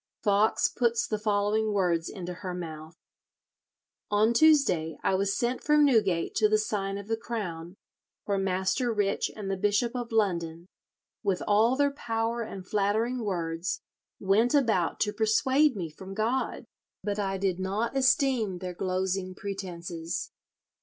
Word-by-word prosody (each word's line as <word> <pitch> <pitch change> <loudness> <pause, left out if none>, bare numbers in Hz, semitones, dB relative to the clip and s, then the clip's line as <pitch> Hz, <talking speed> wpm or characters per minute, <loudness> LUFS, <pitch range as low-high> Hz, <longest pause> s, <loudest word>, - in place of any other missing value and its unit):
Foxe 205 +1 +3
puts 235 -1 +1
the 215 - -2
following 210 +1 +1
words 175 -4 +1
into 180 -3 -6
her 180 0 -6
mouth: 160 -2 -7 1.1
"On 215 +3 +3
Tuesday 235 - +4
I - - +2
was 195 +1 +1
sent 245 +1 -1
from 300 0 +5
Newgate 200 -10 +2
to 215 -1 +4
the 215 - +4
Sign 200 -2 -2
of 200 0 -8
the 225 - 0
Crown, 185 -7 -5 0.5
where 200 -1 0
Master 190 +6 0
Rich 205 -2 0
and 200 -3 -4
the 195 - -1
Bishop 210 +5 +1
of 240 -2 -4
London, 170 -6 0 0.6
with 190 -3 -1
all 220 +4 +4
their 285 +1 +2
power 230 -3 -2
and 195 -4 -7
flattering 220 +4 0
words, 170 -3 -2 0.4
went 215 +7 +3
about 220 - +2
to 210 -1 +1
persuade 260 +6 +3
me 180 -4 -3
from 190 +5 -10
God, 230 +5 -1 0.4
but 205 0 -2
I 195 -1 -1
did 190 -1 -1
not 205 +7 -2
esteem 260 -7 +2
their 180 0 -5
glosing 185 +1 -2
pretences. 175 -4 -5
205 Hz, 145 wpm, -28 LUFS, 185-230 Hz, 1.1 s, from